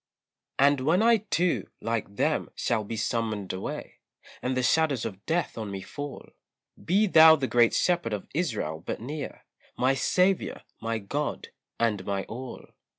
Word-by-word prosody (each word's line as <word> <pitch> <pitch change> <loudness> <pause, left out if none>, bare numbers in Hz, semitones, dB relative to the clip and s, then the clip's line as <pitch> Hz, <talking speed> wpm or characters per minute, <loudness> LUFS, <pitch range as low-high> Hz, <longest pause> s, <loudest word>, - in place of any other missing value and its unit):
And 140 0 +4
when 160 +10 +2
I 230 0 +6
too, 180 -4 0
like 115 -3 -3
them, - - 0
shall 110 -2 0
be 110 +2 -5
summoned 110 -4 -2
away, 95 - -6 0.4
And 130 0 -1
the 130 - +1
shadows 145 -3 +2
of 100 -3 -6
death 165 -7 -1
on 110 -2 -4
me 100 -1 -5
fall, 145 -2 -7 0.6
Be 200 +5 +3
thou 160 -4 +8
the 140 -4 -2
Great 120 -2 +3
Shepherd 175 -9 +1
of 105 -2 -3
Israel 105 - -2
but - - -4
near, 140 +5 -6 0.3
My 130 +2 +3
Saviour, 180 +8 +1 0.2
my 115 0 -1
God, 140 +9 -3 0.3
and 110 -4 +1
my 100 -1 -2
all. 125 +2 -8
130 Hz, 155 wpm, -27 LUFS, 110-160 Hz, 0.6 s, thou